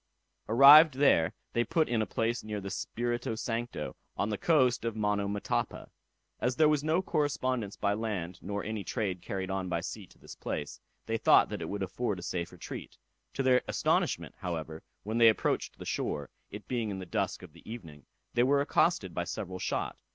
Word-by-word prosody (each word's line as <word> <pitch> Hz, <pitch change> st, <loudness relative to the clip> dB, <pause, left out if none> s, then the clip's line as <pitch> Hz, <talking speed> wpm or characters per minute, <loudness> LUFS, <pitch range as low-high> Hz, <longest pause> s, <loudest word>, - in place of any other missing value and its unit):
Arrived 140 Hz, +5 st, +9 dB
there, 90 Hz, -, +4 dB, 0.2 s
they 120 Hz, -, +2 dB
put 165 Hz, +3 st, +1 dB
in 115 Hz, -2 st, +1 dB
a 110 Hz, -, -1 dB
place 115 Hz, +3 st, -1 dB
near 105 Hz, -1 st, -4 dB
the -, -, -10 dB
river -, -, -3 dB
Spirito 120 Hz, +3 st, -2 dB
Sancto, 115 Hz, +1 st, -4 dB, 0.2 s
on 100 Hz, -, 0 dB
the 105 Hz, -, -1 dB
coast 130 Hz, -8 st, +3 dB
of 115 Hz, -1 st, -2 dB
Monomotapa. 105 Hz, -1 st, -1 dB, 0.5 s
As 125 Hz, 0 st, 0 dB
there 155 Hz, +2 st, +5 dB
was 150 Hz, -1 st, +2 dB
no 160 Hz, +4 st, +1 dB
correspondence 130 Hz, -, -1 dB
by 100 Hz, 0 st, 0 dB
land, 95 Hz, -5 st, -3 dB
nor 100 Hz, +1 st, -4 dB
any 110 Hz, -2 st, -4 dB
trade 95 Hz, -7 st, -2 dB
carried 95 Hz, 0 st, -4 dB
on 95 Hz, -1 st, -2 dB
by 85 Hz, -, 0 dB
sea 95 Hz, +3 st, -6 dB
to -, -, -22 dB
this -, -, -11 dB
place, 75 Hz, -, -5 dB, 0.3 s
they 115 Hz, 0 st, -1 dB
thought -, -, +5 dB
that 105 Hz, -4 st, -5 dB
it 80 Hz, -, -4 dB
would 100 Hz, -1 st, -3 dB
afford 100 Hz, +2 st, -2 dB
a 90 Hz, -, -8 dB
safe 85 Hz, -1 st, -3 dB
retreat. -, -, -8 dB, 0.4 s
To 135 Hz, -, 0 dB
their 130 Hz, -1 st, +4 dB
astonishment, -, -, 0 dB
however, 80 Hz, -2 st, -4 dB, 0.2 s
when 110 Hz, +3 st, -2 dB
they 115 Hz, -1 st, +8 dB
approached 110 Hz, -, -1 dB
the -, -, -9 dB
shore, 70 Hz, -2 st, -3 dB, 0.2 s
it 105 Hz, +1 st, -9 dB
being 120 Hz, -4 st, -1 dB
in 100 Hz, -, -4 dB
the 95 Hz, -, -6 dB
dusk 95 Hz, +1 st, -2 dB
of 85 Hz, -5 st, -12 dB
the 85 Hz, +6 st, -12 dB
evening, 80 Hz, -, -10 dB, 0.3 s
they 120 Hz, -, +3 dB
were 140 Hz, +3 st, +4 dB
accosted 140 Hz, -, +1 dB
by 90 Hz, -, -2 dB
several 95 Hz, 0 st, -5 dB
shot. -, -, -2 dB
105 Hz, 195 wpm, -30 LUFS, 95-125 Hz, 0.5 s, Arrived